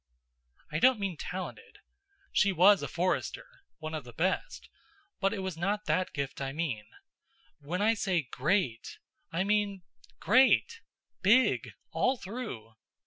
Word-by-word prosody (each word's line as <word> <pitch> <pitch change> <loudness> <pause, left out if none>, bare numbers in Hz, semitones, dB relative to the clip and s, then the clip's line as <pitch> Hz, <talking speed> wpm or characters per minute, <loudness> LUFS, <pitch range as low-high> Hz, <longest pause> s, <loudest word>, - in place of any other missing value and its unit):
I 155 - -1
don't 255 0 +5
mean 195 -3 -2
talented. 185 +4 -7 0.5
She 200 - +3
was 190 +3 +6
a - - -3
forester 180 - -1 0.3
one 155 0 -6
of 155 -2 -4
the 120 - -11
best 65 - -2 0.5
but 195 - +2
it 190 - -3
was 190 -3 -4
not 205 +4 -1
that 180 +4 0
gift 140 -1 -4
I 135 0 -3
mean. 145 -10 -3 0.7
When 175 +7 -2
I 225 +2 +4
say 190 -6 0
great, 130 - 0 0.3
I 185 - 0
mean 200 -2 0 0.4
great 270 - +4 0.4
big, 235 +7 +3 0.2
all 260 +1 +1
through. 195 - -7
185 Hz, 140 wpm, -30 LUFS, 150-205 Hz, 0.7 s, was